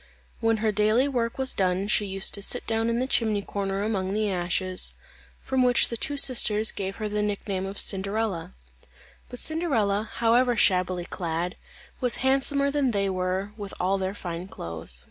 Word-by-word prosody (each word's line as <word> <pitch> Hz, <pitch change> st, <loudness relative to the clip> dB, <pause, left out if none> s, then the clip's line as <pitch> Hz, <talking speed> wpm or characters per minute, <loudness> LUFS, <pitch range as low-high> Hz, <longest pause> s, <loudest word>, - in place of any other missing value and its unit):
When 225 Hz, -1 st, +2 dB
her 215 Hz, -, +3 dB
daily 215 Hz, +6 st, +2 dB
work 235 Hz, -4 st, -2 dB
was 265 Hz, -1 st, 0 dB
done 185 Hz, +1 st, 0 dB
she 210 Hz, -1 st, +1 dB
used 195 Hz, +1 st, 0 dB
to 200 Hz, -, -1 dB
sit 245 Hz, +5 st, 0 dB
down 225 Hz, 0 st, 0 dB
in 230 Hz, -, 0 dB
the 255 Hz, -, 0 dB
chimney 220 Hz, -5 st, +1 dB
corner 195 Hz, 0 st, -3 dB
among 195 Hz, -3 st, -1 dB
the 210 Hz, -1 st, 0 dB
ashes; 185 Hz, +1 st, 0 dB, 0.5 s
from 265 Hz, -1 st, 0 dB
which 250 Hz, -1 st, +4 dB
the 235 Hz, -, -4 dB
two 285 Hz, +5 st, 0 dB
sisters 220 Hz, -5 st, +5 dB
gave 195 Hz, 0 st, -4 dB
her 215 Hz, -, -4 dB
the 210 Hz, 0 st, -1 dB
nick 205 Hz, 0 st, -3 dB
name 190 Hz, -1 st, -2 dB
of 195 Hz, +1 st, -7 dB
Cinderella. 195 Hz, -, -1 dB, 0.7 s
But 245 Hz, -, -8 dB
Cinderella, 225 Hz, -11 st, 0 dB
however 240 Hz, +1 st, +3 dB
shabbily 185 Hz, -3 st, +2 dB
clad, 175 Hz, 0 st, -3 dB, 0.4 s
was 250 Hz, -2 st, +3 dB
handsomer 280 Hz, +1 st, +2 dB
than 285 Hz, -2 st, +1 dB
they 200 Hz, -3 st, 0 dB
were 185 Hz, +2 st, -2 dB
with 205 Hz, -2 st, -7 dB
all 190 Hz, +2 st, +1 dB
their 190 Hz, +1 st, -3 dB
fine 175 Hz, -1 st, -6 dB
clothes. 80 Hz, -, -3 dB
205 Hz, 180 wpm, -26 LUFS, 190-235 Hz, 0.7 s, sisters